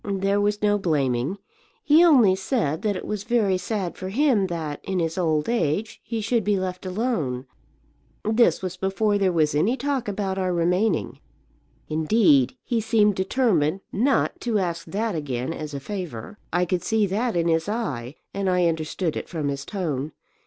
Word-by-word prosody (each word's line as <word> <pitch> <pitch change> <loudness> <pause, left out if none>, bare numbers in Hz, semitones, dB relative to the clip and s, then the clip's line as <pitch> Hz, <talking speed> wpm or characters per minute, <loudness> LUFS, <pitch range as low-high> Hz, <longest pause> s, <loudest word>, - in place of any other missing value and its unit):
"There 200 0 0
was 205 +1 0
no 205 0 +3
blaming. 140 -2 0 0.5
He 315 0 +6
only 250 - +6
said 190 - -1
that 210 -2 0
it - - -5
was 210 -2 -3
very 210 -6 +1
sad 190 -2 -3
for 185 - -6
him 235 -3 +2
that, 160 -4 -4
in 190 - -2
his 165 -2 -1
old 155 -4 0
age, 205 -2 -1
he 230 -1 -3
should 225 +1 +1
be 205 0 +1
left 185 0 -4
alone. 180 - -2 0.8
This 220 -1 +3
was 185 -1 -4
before 200 +2 +1
there 190 -2 +2
was 155 -4 +2
any 205 - +2
talk 275 -4 -2
about 195 -1 -2
our 185 -1 0
remaining. 180 +2 0 0.7
Indeed 155 - +3
he 235 -2 0
seemed 215 -1 +3
determined 190 - +1
not 260 +7 +1
to 235 -3 0
ask 170 -2 -2
that 215 +2 -2
again 140 -2 -3
as 150 -3 -6
a - - -3
favour. 180 - -6
I 175 +1 +2
could 180 0 -1
see 220 -2 +1
that 215 +4 -1
in 170 0 +1
his 165 +3 +1
eye, 145 - -3 0.2
and 195 -1 -1
I 180 -1 +2
understood 160 +1 -1
it - - -5
from 155 -5 -2
his 140 -1 -4
tone. 155 -7 -3
190 Hz, 175 wpm, -24 LUFS, 160-215 Hz, 0.8 s, He